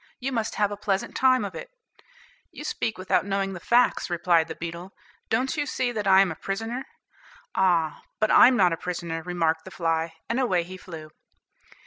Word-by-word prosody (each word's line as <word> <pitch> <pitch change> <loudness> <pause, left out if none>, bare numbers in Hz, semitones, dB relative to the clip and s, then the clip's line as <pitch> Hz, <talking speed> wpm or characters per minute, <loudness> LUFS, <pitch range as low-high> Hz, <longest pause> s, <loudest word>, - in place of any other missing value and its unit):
You 265 +2 -3
must 225 -3 -2
have 205 -1 +1
a 205 - -5
pleasant 200 -2 -2
time 255 -4 +3
of 195 - -6
it." - - -8 0.8
"You - - -9
speak 225 - -2
without 185 0 +1
knowing 195 0 -1
the 180 - -7
facts," 240 +4 +2
replied 170 -1 +2
the 160 - -6
beetle; 170 +3 -7 0.4
"don't 255 +4 0
you 295 -2 -1
see 255 -1 -1
that 210 -3 -3
I 190 0 +7
am 195 -3 +2
a - - -5
prisoner?" 225 - -4 0.7
"Ah, 170 -5 +1 0.2
but 215 0 +2
I'm 250 0 +7
not 180 -3 +4
a - - -2
prisoner," 170 -2 -4
remarked 165 -2 -1
the 190 - -10
fly, 165 -2 -1
and 235 +3 -1
away 185 -9 +1
he 185 +2 -9
flew. 160 -4 -10
190 Hz, 190 wpm, -25 LUFS, 170-225 Hz, 0.8 s, I